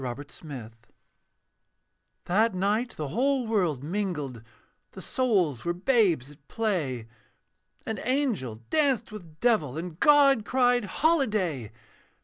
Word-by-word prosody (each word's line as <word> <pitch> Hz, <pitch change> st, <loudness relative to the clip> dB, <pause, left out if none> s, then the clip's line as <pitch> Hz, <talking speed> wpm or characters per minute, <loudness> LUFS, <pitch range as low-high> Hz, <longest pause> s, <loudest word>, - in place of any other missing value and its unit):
A -, -, -7 dB
CERTAIN 145 Hz, +2 st, -12 dB
EVENING 120 Hz, -5 st, -7 dB, 1.5 s
That 210 Hz, +3 st, +2 dB
night 210 Hz, +6 st, 0 dB
the 150 Hz, -3 st, -4 dB
whole 260 Hz, -, +1 dB
world 180 Hz, -, 0 dB
mingled, 155 Hz, -, -3 dB, 0.5 s
The 190 Hz, -, -9 dB
souls 190 Hz, -, 0 dB
were 175 Hz, 0 st, -1 dB
babes 180 Hz, -, +2 dB
at 145 Hz, 0 st, -20 dB
play, 160 Hz, -, -2 dB, 0.8 s
And 220 Hz, -, -4 dB
angel 230 Hz, -, -1 dB
danced 270 Hz, -8 st, +2 dB
with 170 Hz, -7 st, -11 dB
devil. 170 Hz, -, +1 dB
And 170 Hz, 0 st, -6 dB
God 280 Hz, -5 st, +5 dB
cried, 245 Hz, -1 st, +2 dB
'Holiday!' 210 Hz, -, 0 dB
195 Hz, 120 wpm, -27 LUFS, 150-245 Hz, 1.5 s, God